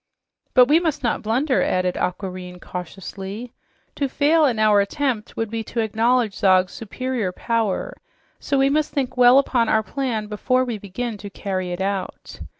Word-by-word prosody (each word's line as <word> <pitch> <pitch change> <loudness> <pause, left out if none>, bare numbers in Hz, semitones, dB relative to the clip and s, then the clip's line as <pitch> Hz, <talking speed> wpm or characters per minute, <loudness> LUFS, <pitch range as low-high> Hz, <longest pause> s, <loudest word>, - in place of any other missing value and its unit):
"But 250 -2 +8
we 305 +4 +5
must 315 -5 -2
not 235 - 0
blunder," 255 +6 +1
added 185 0 +1
Aquareine 180 -1 -4
cautiously. 195 +6 -7 0.4
"To 280 -2 0
fail 305 +4 +3
in 245 -5 +1
our 215 -1 +4
attempt 240 +1 -2
would 225 -1 -2
be 225 -1 -3
to 235 - -4
acknowledge 225 +1 +1
Zog's 185 -3 +3
superior 230 -2 -3
power, 225 0 -1 0.5
so 280 - -1
we 270 +1 +3
must 305 +1 +1
think 265 -3 -2
well 250 +1 +7
upon 250 -4 +2
our 220 0 +3
plan 240 -3 -2
before 255 +5 0
we 235 -4 -4
begin 210 +4 -5
to 200 +1 -7
carry 190 -2 -4
it 175 +1 -4
out. 195 -1 -4
225 Hz, 165 wpm, -22 LUFS, 195-255 Hz, 0.5 s, But